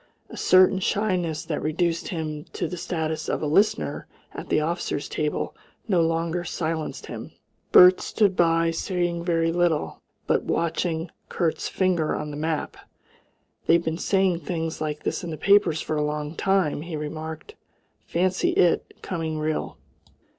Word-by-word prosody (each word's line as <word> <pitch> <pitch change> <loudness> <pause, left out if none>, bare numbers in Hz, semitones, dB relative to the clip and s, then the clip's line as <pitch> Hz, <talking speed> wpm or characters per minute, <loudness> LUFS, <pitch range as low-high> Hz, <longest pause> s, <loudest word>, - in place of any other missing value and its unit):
A - - -8
certain 185 +1 +5
shyness 180 -5 0
that 155 - -3
reduced 165 +2 0
him 155 -3 -4
to - - -2
the 180 - -5
status 160 -2 -3
of - - -1
a - - +1
listener 195 +9 +1 0.3
at - - -8
the - - +3
officers' 155 -2 -2
table 150 -1 -2 0.3
no 185 -6 +3
longer 165 +1 0
silenced 160 -2 -3
him. - - -8 0.4
Bert 180 0 +8
stood 200 -4 +1
by, 165 -1 +3
saying 175 0 -1
very 165 -1 +1
little, 170 -3 0 0.2
but - - +2
watching 165 0 -1 0.2
Kurt's 170 -3 -1
finger 180 -5 +1
on 150 0 -4
the - - -6
map. 155 +1 -2 0.9
"They've 170 +1 +4
been 160 +1 -2
saying 190 -3 +2
things 165 -3 -4
like 150 -1 -3
this - - -2
in 175 - -4
the 155 - -5
papers 200 -5 +4
for 155 - -2
a - - +1
long 150 0 -3
time," 190 -5 +1
he 170 0 -6
remarked. 155 - -6 0.5
"Fancy 185 +2 +1
it 175 - +1
coming 160 -3 -3
real!" 155 0 -2
165 Hz, 155 wpm, -25 LUFS, 155-180 Hz, 0.9 s, Bert